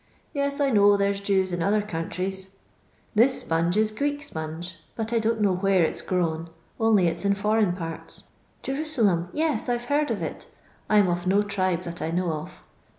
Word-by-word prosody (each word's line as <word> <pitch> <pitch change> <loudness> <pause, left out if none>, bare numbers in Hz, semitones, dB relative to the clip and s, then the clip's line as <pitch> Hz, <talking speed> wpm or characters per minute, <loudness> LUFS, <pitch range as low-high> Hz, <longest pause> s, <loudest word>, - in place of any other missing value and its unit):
Yei^ 280 +1 0
I 280 -1 +2
know 205 -2 +5
there 200 0 +2
's 195 - -5
Jews 190 -2 +1
in 175 - -1
other 205 +4 +2
countries. 190 +1 -4 0.6
TUs 250 +5 +5
sponge 170 +3 0
is 215 0 +2
Greek 285 +5 -2
sponge, 165 - -6 0.2
but 225 0 -3
I 230 - +3
don't 225 0 0
know 200 -2 +3
where 190 -1 +3
it 160 - 0
's - - 0
grown, 165 -3 -1 0.3
only 220 -5 +4
it 165 0 +1
's - - -5
in 200 0 +2
foreign 210 -2 +2
parts. 165 -3 -6 0.3
Jeru 270 +1 -2
niem! 205 - +1
Tea, 310 - -1 0.3
I 240 - +2
Ve 240 - -9
heard 290 +3 +1
of - - -2
it - - -6 0.4
I 215 - +5
*m 205 -2 +5
of 175 +1 -1
no 200 +2 +4
tribe 185 -3 -1
that 170 -1 -6
I - - -1
know 175 0 0
of. 155 0 -7
200 Hz, 210 wpm, -25 LUFS, 175-220 Hz, 0.6 s, know